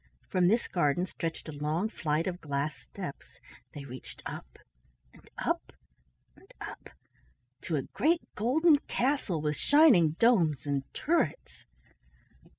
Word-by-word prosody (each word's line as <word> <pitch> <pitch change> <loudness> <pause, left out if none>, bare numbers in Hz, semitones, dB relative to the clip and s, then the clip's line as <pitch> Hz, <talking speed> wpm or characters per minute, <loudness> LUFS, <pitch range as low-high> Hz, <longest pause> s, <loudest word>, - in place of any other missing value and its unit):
From 180 -1 +3
this 225 +5 +2
garden 170 0 +1
stretched 165 -3 -5
a - - -5
long 155 +6 -1
flight 160 -6 -1
of 180 -1 -4
glass 145 0 -2 0.2
steps. 180 -8 -8 0.4
They 140 -1 -7
reached 130 -1 -10
up - - -8 0.6
and - - -19
up - - -2 0.6
and - - -20
up - - -8 0.7
to 165 - -2
a 140 - 0
great 330 +4 +1
golden 290 +8 +4
castle 245 - 0
with 150 -1 -1
shining 255 - +5
domes 175 - +3
and 140 -2 -2
turrets. 340 - -1
170 Hz, 130 wpm, -30 LUFS, 150-235 Hz, 0.7 s, shining